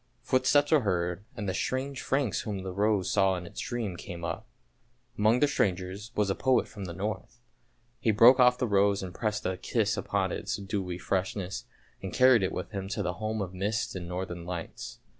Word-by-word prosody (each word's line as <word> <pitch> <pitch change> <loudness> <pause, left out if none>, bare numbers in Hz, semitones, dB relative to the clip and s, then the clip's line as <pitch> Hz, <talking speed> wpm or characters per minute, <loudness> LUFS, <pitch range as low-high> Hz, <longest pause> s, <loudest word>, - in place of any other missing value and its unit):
Footsteps 145 +3 +3
were 155 - +6
heard 90 -3 -1
and 105 -2 -3
the 95 - 0
strange 130 +7 -2
Franks 135 -6 0
whom 100 -3 -4
the 95 - -4
rose 100 -1 +1
saw 95 -2 +3
in 90 -1 -5
its - - -9
dream 115 -6 -3
came 85 0 -8
up. 80 0 -4 0.7
Among 110 +3 +3
the 145 - +6
strangers 100 -3 -1
was 105 -2 +2
a - - +2
poet 130 +5 +2
from 105 -3 -8
the 85 - -6
North, 100 +4 -5 0.6
he - - 0
broke 115 +5 +7
off 125 0 +6
the 125 - 0
rose 100 -2 +2
and 90 -1 -6
pressed 110 0 -2
a 95 0 -1
kiss 110 +1 0
upon 100 -1 0
its 110 +3 -2
dewy 95 -3 -3
freshness, 95 +1 -2 0.4
and 95 - -5
carried 130 -3 +6
it 95 - 0
with 90 - -5
him 95 -2 -4
to 100 +1 -2
the 90 - -1
home 110 -1 -1
of 95 -1 -7
mists 100 +4 -1
and 90 -2 -6
northern 90 -1 -4
lights. 85 -1 -6
100 Hz, 200 wpm, -29 LUFS, 95-110 Hz, 0.7 s, broke